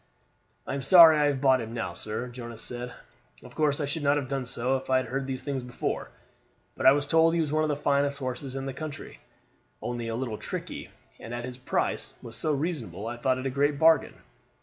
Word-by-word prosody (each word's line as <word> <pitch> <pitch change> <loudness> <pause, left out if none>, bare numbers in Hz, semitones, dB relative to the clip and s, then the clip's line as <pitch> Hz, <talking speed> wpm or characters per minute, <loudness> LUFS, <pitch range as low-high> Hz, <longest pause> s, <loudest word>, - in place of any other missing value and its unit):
"I - - -4
am 140 - -2
sorry 160 +1 +8
I 150 - +4
have 140 -2 0
bought 130 -2 +4
him 115 +1 -6
now, 95 -6 -3
sir," 110 +6 -4
Jonas 120 -2 -6
said. 125 0 -5 0.5
"Of 125 - -13
course 150 0 +1
I 145 - 0
should 150 +3 -3
not 145 0 +3
have 140 -3 -2
done 135 -1 -2
so 125 +2 +2
if 130 - -10
I 130 - +4
had 130 - 0
heard 135 +1 -3
these 130 -1 -4
things 140 -2 -2
before; 125 0 -4 0.7
but - - +2
I - - +10
was 140 0 +2
told 165 +2 +4
he - - +1
was 155 -3 0
one 155 +1 +2
of 155 - +1
the 145 - +1
finest 140 0 +1
horses 130 0 -5
in 135 0 -4
the 135 - -4
country, 150 +1 -7 0.6
only 120 -1 -4
a 115 - -2
little 120 -3 -3
tricky, - - -6 0.3
and 115 - -7
as 120 0 -4
his 125 -1 -7
price 130 - -2
was 115 -1 -6
so 155 +7 0
reasonable 145 - -3
I 120 +1 -4
thought 130 +2 +1
it 130 - -5
a 135 - 0
great 145 +2 +1
bargain. 160 +2 +4
135 Hz, 235 wpm, -27 LUFS, 125-145 Hz, 0.7 s, I